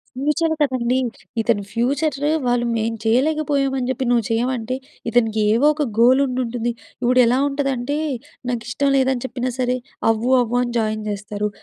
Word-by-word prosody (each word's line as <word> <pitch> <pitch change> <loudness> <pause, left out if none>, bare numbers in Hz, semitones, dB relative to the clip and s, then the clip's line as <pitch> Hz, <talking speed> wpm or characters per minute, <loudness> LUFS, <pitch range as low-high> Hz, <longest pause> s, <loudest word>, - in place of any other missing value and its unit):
Future 300 +5 +1
కదండీ. 255 -3 +1 0.4
ఇతను 225 -3 +1
ఫ్యూచర్రు 280 +4 0 0.2
వాళ్ళు 245 0 +1
మేం 225 0 -1
చెయ్యలేకపోయామని 275 +1 +1
జెప్పి 260 0 -1
నువ్వు 240 -2 +3
చెయ్యమంటే, 240 +1 -1 0.3
ఇతనికి 225 -2 +2
ఏవోక 295 +6 +3 0.2
గోలుండుంటుంది. 245 -1 +2 0.3
ఇప్పుడెలా 250 0 +4
ఉంటదంటే, 275 -1 -1 0.5
నాకిష్టం 240 +3 -1
లేదని 265 -2 +1
చెప్పినా 255 0 -3
సరే, 250 0 +1 0.3
అవ్వు, 225 +3 +1
అవ్వు 240 0 -1
అని 245 -1 -2
జాయిన్ 215 -1 -1
జేస్తారు. 210 0 -3
245 Hz, 125 wpm, -21 LUFS, 230-270 Hz, 0.5 s, ఇప్పుడెలా